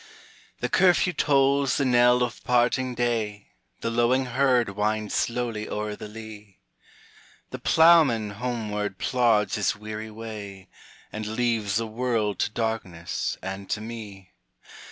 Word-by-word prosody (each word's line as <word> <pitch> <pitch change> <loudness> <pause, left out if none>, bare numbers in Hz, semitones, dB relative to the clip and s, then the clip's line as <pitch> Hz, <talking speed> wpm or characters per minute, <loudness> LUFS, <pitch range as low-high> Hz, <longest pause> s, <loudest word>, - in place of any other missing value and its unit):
The - - 0
curfew 180 -1 +3
tolls 140 -2 +2
the 140 - +1
knell 125 0 +4
of 125 - -4
parting 125 +1 +1
day, 110 -4 -2 0.3
The 115 - -2
lowing 120 +3 +2
herd 125 -2 +2
wind 105 +1 -1
slowly 115 -3 -2
o'er 105 0 -3
the 105 - -8
lea, 105 -2 -11 0.9
The - - -6
ploughman 155 -10 +5
homeward 105 -3 -3
plods 115 -4 +2
his 105 - +1
weary 110 +1 -7
way, 105 -4 -9 0.4
And 110 0 -5
leaves 110 -3 0
the 115 +2 +1
world 110 -3 -1
to - - +1
darkness 105 -7 -3
and 95 0 -6
to - - -1
me. 105 -4 -9
110 Hz, 130 wpm, -25 LUFS, 105-125 Hz, 0.9 s, ploughman